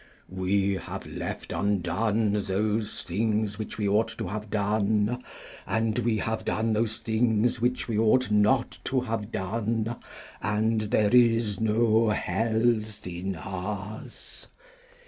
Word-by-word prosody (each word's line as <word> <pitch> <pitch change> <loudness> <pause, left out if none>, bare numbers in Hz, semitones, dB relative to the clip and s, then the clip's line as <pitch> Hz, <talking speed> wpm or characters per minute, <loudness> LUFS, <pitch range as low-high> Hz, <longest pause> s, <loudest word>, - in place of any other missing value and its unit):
"We 95 +1 +1
have - - -7
left - - -5
undone 100 +2 +1
those 105 +2 -1
things 105 +2 -1
which 110 - -5
we 105 -1 0
ought 105 +3 +3
to - - -3
have 105 +1 -5
done; 105 +3 +1 0.4
and 110 0 0
we 115 -2 +1
have 110 +1 -2
done 110 +1 0
those 110 0 0
things 115 +1 +1
which 125 +1 0
we 110 -3 0
ought 115 +2 +3
not 105 +4 +2
to 130 -1 +1
have 115 -3 -3
done; 115 +3 -1 0.5
and 110 +3 +1
there 105 0 +2
is 115 -4 +4
no 110 0 +3
health 110 0 0
in 90 +2 -4
us." 100 +4 -7
110 Hz, 125 wpm, -27 LUFS, 105-115 Hz, 0.5 s, is